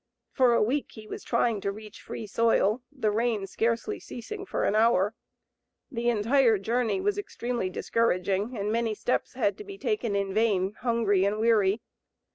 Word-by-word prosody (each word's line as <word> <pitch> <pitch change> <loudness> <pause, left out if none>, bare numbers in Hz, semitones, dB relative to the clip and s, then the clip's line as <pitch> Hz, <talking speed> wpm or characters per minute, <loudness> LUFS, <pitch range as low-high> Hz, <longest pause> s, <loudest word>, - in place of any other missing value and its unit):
For 250 -2 +4
a - - +4
week 265 +6 -1
he 220 -2 -11
was - - -7
trying 225 -4 +1
to 200 - -1
reach 215 +1 -11
free 225 - -6
soil, 225 +1 +2
the 255 -7 0
rain 220 -2 0
scarcely 230 +4 -1
ceasing 390 - -8
for - - -2
an - - +2
hour. 215 -2 +3 0.8
The 240 -2 0
entire 235 +1 +3
journey 230 - 0
was 410 +2 0
extremely 240 - -3
discouraging, 200 +2 0
and 205 +1 -1
many 225 -1 0
steps 245 - -1
had 250 -6 0
to - - -6
be 395 -1 -9
taken 395 - -1
in 200 -1 -1
vain, 205 -3 +2
hungry 230 -6 +2
and 200 +2 +1
weary. 215 -2 +2
225 Hz, 170 wpm, -27 LUFS, 205-240 Hz, 0.8 s, For